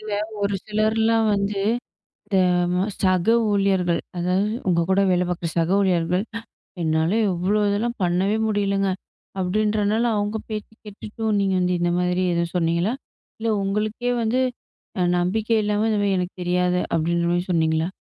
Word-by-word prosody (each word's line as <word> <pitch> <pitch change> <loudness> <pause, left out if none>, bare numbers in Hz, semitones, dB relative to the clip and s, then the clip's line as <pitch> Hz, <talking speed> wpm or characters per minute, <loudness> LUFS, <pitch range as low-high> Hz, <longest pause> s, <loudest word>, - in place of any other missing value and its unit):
இல்ல 215 -1 -7 0.3
ஒரு 200 0 0
சிலர்லாம் 220 +1 +2
வந்து, 200 0 -1 0.7
இந்த 195 - 0 0.4
ம 180 +1 +1 0.2
சக 185 -1 +2 0.2
ஊழியர்கள் 190 -4 +1 0.2
அதாவது, 180 +4 +1 0.2
உங்க 170 -2 +3
கூட 195 +1 +3
வேல 180 0 +2
பார்க்கிற 175 -1 -2
சக 165 +2 +1
ஊழியர்கள், 180 -1 +1 0.6
"என்னால 160 +1 +1 0.2
இவ்ளோ 185 +4 0
இதெல்லாம் 230 +4 -1
பண்ணவே 185 +4 +1
முடியலைங்க. 200 -2 0 0.5
அப்டின்றனால 210 +3 +1
அவங்க 205 +1 -1
பேச்சு 215 0 -6
கேட்டுட்டு. 210 0 -10
சோ 225 - -1
நீங்க 195 -1 +1
வந்து 180 0 +1
இந்த 175 0 +1
மாதிரி 180 +1 0
எதுவும் 170 0 -1
சொன்னீங்களா? 170 +6 +1 0.5
இல்ல 225 - -1
உங்களுக்கே 215 +5 -1
வந்து, 230 +3 +1 0.6
அ - - +2 0.2
நம்பிக்கை 220 +5 +1
இல்லாம 210 +1 +1
இந்த 210 - +1
மாரி 195 -1 +2
"எனக்கு 180 0 -4
தெரியாது"அப்டின்ற 175 -1 0
மாரி 175 0 0
சொன்னீங்களா? 160 0 +1
195 Hz, 145 wpm, -23 LUFS, 175-210 Hz, 0.7 s, உங்க